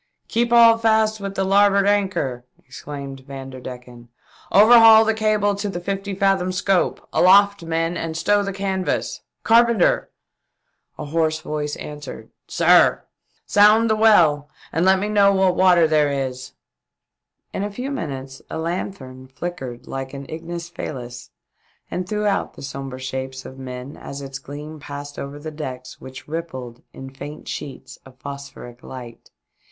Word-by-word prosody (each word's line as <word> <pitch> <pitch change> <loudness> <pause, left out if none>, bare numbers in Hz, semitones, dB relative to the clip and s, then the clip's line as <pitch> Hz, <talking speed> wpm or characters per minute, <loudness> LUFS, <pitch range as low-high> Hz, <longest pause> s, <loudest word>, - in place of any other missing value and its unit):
" - - -52
Keep 235 +1 0
all 230 -1 +7
fast 220 -1 +2
with 195 -1 -5
the 195 - 0
larboard 200 +1 +4
anchor 190 -12 0
!" - - -47
exclaimed 140 0 -8
Vanderdecken. 125 -3 -9 0.2
" - - -26
Overhaul 225 0 +8
the 220 - +2
cable 215 -2 +1
to 200 +1 -3
the 175 - -4
fifty 195 +2 -4
fathom 195 -2 +1
scope. 185 0 0
Aloft 200 +2 +5
men 165 +1 -1
and 165 -1 -4
stow 205 +4 +2
the 200 -1 -3
canvas. 190 -1 -2 0.2
Carpenter 230 -3 +3 0.4
!" - - -51
A 150 - -6
hoarse 155 +1 0
voice 150 -1 -3
answered, 150 -1 -9
" - - -58
Sir - - +5
?" - - -55
" - - -40
Sound 215 +2 +5
the - - +3
well 165 -10 +4 0.2
and 165 +3 +1
let 190 0 +5
me 200 +2 -2
know 205 -1 +4
what 190 -2 +2
water 180 -3 +5
there 155 -2 +3
is." 130 -2 -4 1.0
In - - -3
a 205 - -2
few 250 +7 -5
minutes 135 - -6
a - - -5
lanthorn 160 -6 -5
flickered 130 -4 -7
like 135 0 -6
an 140 0 -7
ignis 170 +1 -6
fahms 125 -7 -7 0.6
and 180 0 -4
threw 210 0 -1
out 200 -1 -1
the - - -11
sombre 135 -1 -6
shapes 130 0 -5
of 130 - -10
men 130 +1 -7
as 140 - -8
its 135 -1 -7
gleam 150 +3 -9
passed 145 0 -8
over 140 +1 -6
the 155 +2 -7
decks 130 -4 -8
which 130 0 -11
rippled 130 -7 -6
in 135 0 -10
faint 145 +3 -9
sheets 140 - -7
of 130 -1 -17
phosphoric 140 -3 -9
light. 120 -3 -11
160 Hz, 165 wpm, -21 LUFS, 135-200 Hz, 1.0 s, Overhaul